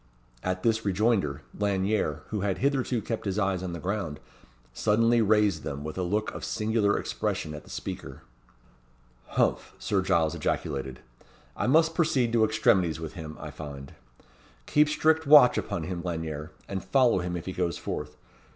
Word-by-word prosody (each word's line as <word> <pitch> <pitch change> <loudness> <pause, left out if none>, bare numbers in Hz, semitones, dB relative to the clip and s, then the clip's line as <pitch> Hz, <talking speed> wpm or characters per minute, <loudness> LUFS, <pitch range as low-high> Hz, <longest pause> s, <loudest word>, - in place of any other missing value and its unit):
At 95 0 -2
this 115 -1 +2
rejoinder, 100 - +1
Lanyere, 100 -6 0
who 105 -2 -2
had 100 -1 0
hitherto 130 -4 0
kept 115 -2 -4
his 100 0 -1
eyes 95 -3 0
on 90 -2 -4
the 85 - -5
ground, 90 -6 -3 0.5
suddenly 115 - +3
raised 105 -5 +3
them, 70 0 -5
with 75 0 -5
a 95 - -2
look 105 +4 -1
of - - -7
singular 105 -1 +1
expression 75 - -3
at 75 - -9
the - - -16
speaker. - - -7 1.0
"Humph!" - - 0
Sir 100 -2 0
Giles 80 -4 +2
ejaculated. 65 -3 -3 0.5
"I - - -1
must 160 +4 +4
proceed 135 -8 +1
to 115 -2 +4
extremities 95 -7 +2
with 80 -2 -6
him, 80 -3 -8
I - - -7
find. 70 -3 -9 0.7
Keep 150 0 +3
strict 155 +1 +2
watch 145 -4 +8
upon - - -2
him, 90 -2 -4
Lanyere; 80 -3 -4 0.2
and 95 -2 -4
follow 120 +2 +3
him 90 0 -3
if 85 - -7
he 95 - -4
goes 90 -3 -1
forth. - - -5
95 Hz, 165 wpm, -27 LUFS, 80-115 Hz, 1.0 s, watch